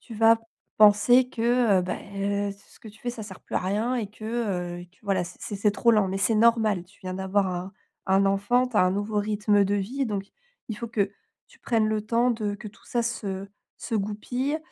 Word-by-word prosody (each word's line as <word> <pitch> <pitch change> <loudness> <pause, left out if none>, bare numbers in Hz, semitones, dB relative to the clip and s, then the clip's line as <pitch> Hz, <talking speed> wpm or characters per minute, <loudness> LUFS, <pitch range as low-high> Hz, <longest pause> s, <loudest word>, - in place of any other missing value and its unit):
tu 230 - -11
vas 225 +1 +5 0.4
penser 240 +5 +6
que, 235 -4 +2
heu, - - -2
beh, 200 +2 -2
ce 200 - -21
ce - - -20
que 220 - -11
tu 215 +1 -16
fais, 245 - -4
ça 235 -2 -7
sert 195 -3 -10
plus - - -10
à - - +1
rien 210 +7 0
et 220 -4 -2
que, 215 +1 -13
heu, 195 -7 -2
et 175 - -10
que, 180 - -31
voilà, 195 -3 0
c'est 170 - -11
c'est 205 - -5
c'est 205 +1 +2
trop 235 +3 +3
lent, 210 -3 +3
mais 195 +1 -2
c'est 220 +3 +2
normal, 220 -5 +3
tu 195 +3 -24
viens 185 0 -4
d'avoir 190 +1 0
un 180 +1 -4 0.3
un 195 +1 +3
enfant, 205 +6 +2
tu 250 -3 -5
as - - +6
un 185 - +3
nouveau 205 +2 -2
rythme 205 -1 +2
de 200 +1 0
vie, 245 +8 -2
donc 200 -2 -3 0.4
il 220 - -4
faut 235 - -5
que 205 -3 0 0.4
tu 480 -1 -21
prennes 225 -3 +1
le 215 -1 0
temps 235 +3 +2
de 215 -3 -2
que 210 +1 -8
tout 205 - -20
ça 240 -1 0
se 200 -4 -3 0.3
se 230 - -5
goupille 245 +8 -2
210 Hz, 235 wpm, -26 LUFS, 195-230 Hz, 0.4 s, penser